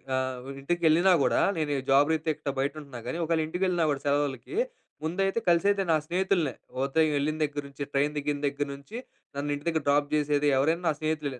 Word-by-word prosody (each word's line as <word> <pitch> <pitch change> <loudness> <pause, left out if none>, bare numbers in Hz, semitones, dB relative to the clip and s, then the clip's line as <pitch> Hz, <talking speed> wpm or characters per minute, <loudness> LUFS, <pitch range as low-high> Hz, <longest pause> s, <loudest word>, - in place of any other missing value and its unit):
ఆహ్, 130 -1 -3
ఇంటికి 175 +5 -1
వెళ్ళినా 175 +4 +5
గూడా - - +2 0.2
నేను 155 -2 -1
ఈ - - -2
జాబ్ 145 +3 +5
రీత్యా 155 -2 -1
బయట 140 +1 +1
ఉంటున్నా 135 -4 -9
గానీ 130 - -3
ఒకవేళ 165 0 +1
ఇంటికి 180 +4 -3
వెళ్ళినా 175 -2 +1
కూడా 140 - -2
సెలవులకి 145 - -1 0.5
ముందైతే 195 +6 0
కలిసేతే 195 +3 +3
నా - - +5
స్నేహితులనే. 175 -5 0 0.3
ఉదయం 155 +3 +2
వెళ్ళిన 155 +2 -1
దగ్గర 145 0 -2
నుంచి 140 +1 -6
ట్రైన్ 145 +2 +1
దిగిన 145 0 -1
దగ్గర 140 +1 -2
నుంచి 140 +12 -10 0.4
నన్ను 145 +1 -3
ఇంటి 145 - -10
దగ్గర 160 -3 0
డ్రాప్ 145 0 +3
జేసేది 150 -1 +2
ఎవరైనా 160 +6 +1
నా - - +4
స్నేహితులే. 150 -4 -2
150 Hz, 190 wpm, -28 LUFS, 140-165 Hz, 0.5 s, వెళ్ళినా